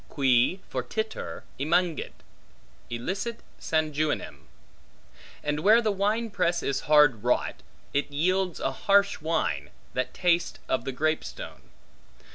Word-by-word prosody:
Qui 135 Hz, +5 st, +3 dB
fortiter 220 Hz, 0 st, -4 dB, 0.2 s
emungit, 170 Hz, +3 st, 0 dB, 0.7 s
elicit 195 Hz, -, -3 dB, 0.2 s
sanguinem; 155 Hz, -1 st, -1 dB, 1.0 s
and 150 Hz, 0 st, -1 dB
where 215 Hz, +7 st, +6 dB
the 220 Hz, -2 st, +1 dB
wine 210 Hz, +3 st, 0 dB
press 170 Hz, -4 st, 0 dB
is 140 Hz, -, 0 dB
hard 150 Hz, -7 st, +6 dB
wrought, 125 Hz, -, +1 dB, 0.4 s
it 145 Hz, +1 st, 0 dB
yields 180 Hz, +4 st, +1 dB
a -, -, 0 dB
harsh 200 Hz, +7 st, +2 dB
wine, 160 Hz, +2 st, -1 dB, 0.2 s
that 130 Hz, -, -1 dB
tastes 175 Hz, -1 st, +1 dB
of 130 Hz, -, 0 dB
the 135 Hz, -, -2 dB
grape 155 Hz, +4 st, 0 dB
stone. -, -, -9 dB
160 Hz, 115 wpm, -27 LUFS, 145-195 Hz, 1.0 s, where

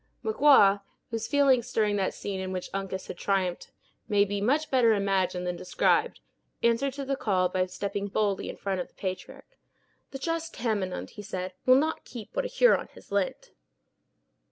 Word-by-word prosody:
Magua, 275 Hz, -, +5 dB, 0.3 s
whose 225 Hz, -1 st, -3 dB
feelings 275 Hz, -5 st, +3 dB
during 210 Hz, -2 st, +1 dB
that 195 Hz, -, -1 dB
scene 195 Hz, -2 st, -4 dB
in 185 Hz, 0 st, -4 dB
which 185 Hz, -1 st, -5 dB
Uncas 195 Hz, -1 st, -4 dB
had 175 Hz, -, -8 dB
triumphed 190 Hz, -3 st, -1 dB, 0.4 s
may 205 Hz, -2 st, +3 dB
be 200 Hz, 0 st, -3 dB
much 290 Hz, +9 st, +1 dB
better 235 Hz, -4 st, +5 dB
imagined 190 Hz, -3 st, 0 dB
than 180 Hz, 0 st, -2 dB
described, 180 Hz, -, +1 dB, 0.4 s
answered 235 Hz, +4 st, +2 dB
to 280 Hz, 0 st, -5 dB
the 275 Hz, +1 st, 0 dB
call 185 Hz, -8 st, +1 dB
by 185 Hz, 0 st, 0 dB
stepping 200 Hz, +2 st, -3 dB
boldly 200 Hz, 0 st, -1 dB
in -, -, -7 dB
front 195 Hz, -2 st, -2 dB
of -, -, -6 dB
the -, -, -33 dB
patriarch. 190 Hz, -, -7 dB, 0.5 s
"The 270 Hz, -, -6 dB
just 330 Hz, +3 st, -3 dB
Tamenund," 210 Hz, -6 st, -2 dB
he 210 Hz, -, -9 dB
said, 185 Hz, -3 st, -5 dB
"will 255 Hz, -, +8 dB
not 310 Hz, +4 st, +1 dB
keep 240 Hz, -, -10 dB
what -, -, 0 dB
a -, -, 0 dB
Huron -, -, +3 dB
has -, -, -16 dB
lent." 200 Hz, -2 st, -1 dB
205 Hz, 180 wpm, -28 LUFS, 190-260 Hz, 0.5 s, will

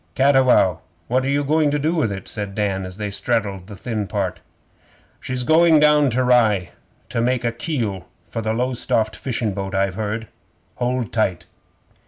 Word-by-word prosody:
'Cattiwow, 130 Hz, -, +4 dB, 0.3 s
what 130 Hz, +2 st, +2 dB
are -, -, 0 dB
you 145 Hz, +1 st, +1 dB
going 150 Hz, +1 st, +2 dB
to 145 Hz, -, 0 dB
do 155 Hz, +3 st, 0 dB
with 150 Hz, -11 st, 0 dB
it?' 95 Hz, -1 st, -6 dB
said 100 Hz, -3 st, -5 dB
Dan, 95 Hz, -3 st, -1 dB
as 90 Hz, +1 st, -9 dB
they 105 Hz, -1 st, -4 dB
straddled 100 Hz, -4 st, -1 dB
the 105 Hz, -, -9 dB
thin 110 Hz, -1 st, -3 dB
part. 100 Hz, -3 st, -2 dB, 0.8 s
'She's 125 Hz, -1 st, -3 dB
going 160 Hz, +3 st, +5 dB
down 150 Hz, -1 st, +5 dB
to 130 Hz, +2 st, +1 dB
Rye 110 Hz, -7 st, +3 dB, 0.4 s
to 115 Hz, -, -1 dB
make 125 Hz, +1 st, +1 dB
a 115 Hz, -, +1 dB
keel 115 Hz, -, -3 dB, 0.2 s
for -, -, -5 dB
a 110 Hz, -1 st, -1 dB
Lowestoft 120 Hz, -2 st, 0 dB
fishin' 115 Hz, -5 st, -2 dB
boat, 95 Hz, 0 st, -4 dB
I've 95 Hz, -1 st, +1 dB
heard. 110 Hz, +2 st, -3 dB, 0.5 s
Hold 125 Hz, -2 st, -2 dB
tight! 95 Hz, -7 st, 0 dB
115 Hz, 175 wpm, -21 LUFS, 100-130 Hz, 0.8 s, going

